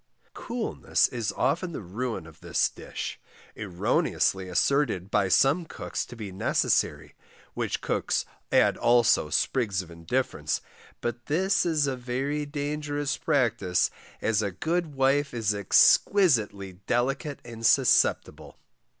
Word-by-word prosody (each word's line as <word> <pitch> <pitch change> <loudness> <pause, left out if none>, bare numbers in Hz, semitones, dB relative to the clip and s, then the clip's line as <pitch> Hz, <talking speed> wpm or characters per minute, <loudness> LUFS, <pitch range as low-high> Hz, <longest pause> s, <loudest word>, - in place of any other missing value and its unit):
Coolness 235 -2 -1
is 115 -3 -3
often 175 0 0
the - - -4
ruin 110 +1 -4
of 80 -2 -15
this - - +1
dish, - - -7 0.4
erroneously 95 -1 0
asserted 100 -2 +1
by 100 -2 +2
some 140 - +3
cooks 160 - -5
to - - -10
be 105 -4 -7
necessary, 95 - 0 0.4
which - - -3
cooks - - -1 0.3
add - - +4
also 120 0 +3
sprigs 100 -8 0
of 85 - -15
indifference, 85 - -2 0.4
but 120 0 -4
this 190 +5 +1
is 155 -3 +2
a 135 -2 -1
very 135 +4 -3
dangerous 145 0 -3
practice, 100 -9 +1 0.3
as 110 -1 +2
a 100 - -1
good 160 - -2
wife 135 0 +1
is 110 -3 +1
exquisitely 105 - +3
delicate 135 +3 -1
and 115 -1 -9
susceptible. 110 - +2
125 Hz, 125 wpm, -27 LUFS, 100-145 Hz, 0.4 s, add